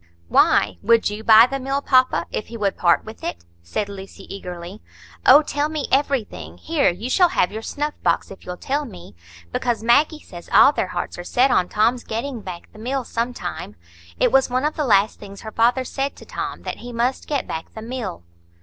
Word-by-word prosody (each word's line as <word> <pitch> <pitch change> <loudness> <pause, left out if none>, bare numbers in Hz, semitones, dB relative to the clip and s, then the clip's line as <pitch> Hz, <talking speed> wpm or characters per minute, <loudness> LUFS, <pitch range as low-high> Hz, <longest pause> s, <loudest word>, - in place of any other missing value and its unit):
"Why? 90 +1 +3
Would 230 -2 +3
you 210 +1 -6
buy 220 +1 +8
the 275 +2 -4
mill, 270 +1 -1
papa, 255 -2 +3
if 215 - -4
he 230 - -8
would 200 -3 0
part 170 -1 +2
with 220 0 -11
it?" 85 0 -5 0.2
said 85 - -3
Lucy, 195 -1 -10
eagerly. 180 +1 -8 0.5
"Oh, 300 - +8
tell 290 0 -1
me 310 -2 -3
everything; 270 -5 -1
here, 320 -3 +1
you 185 +7 -5
shall 360 +7 +4
have 180 - +1
your 220 - -5
snuff 295 +6 -3
box - - 0
if 195 - -12
you'll 180 0 -6
tell 285 +8 -2
me. 180 - -11 0.4
Because 235 - -1
Maggie 290 +7 +3
says 175 - -12
all - - +7
their 190 - -1
hearts 175 0 -5
are - - -5
set 250 +8 +2
on 180 - +2
Tom's 230 +4 +1
getting 235 +2 -4
back 180 -3 -8
the 215 - -14
mill 260 +4 -2
some 235 +1 -2
time. 175 - -6 0.4
It - - +3
was 270 -1 +4
one 255 +3 0
of 305 - 0
the 300 - -1
last 210 -3 +3
things 200 -1 -11
her 220 - -8
father 240 +4 +2
said 270 +2 -3
to - - -14
Tom, - - -5
that - - -5
he 245 - -9
must 240 +3 -1
get 285 -3 -1
back 160 0 -6
the 220 - -7
mill." 230 - -5
230 Hz, 215 wpm, -22 LUFS, 195-270 Hz, 0.5 s, buy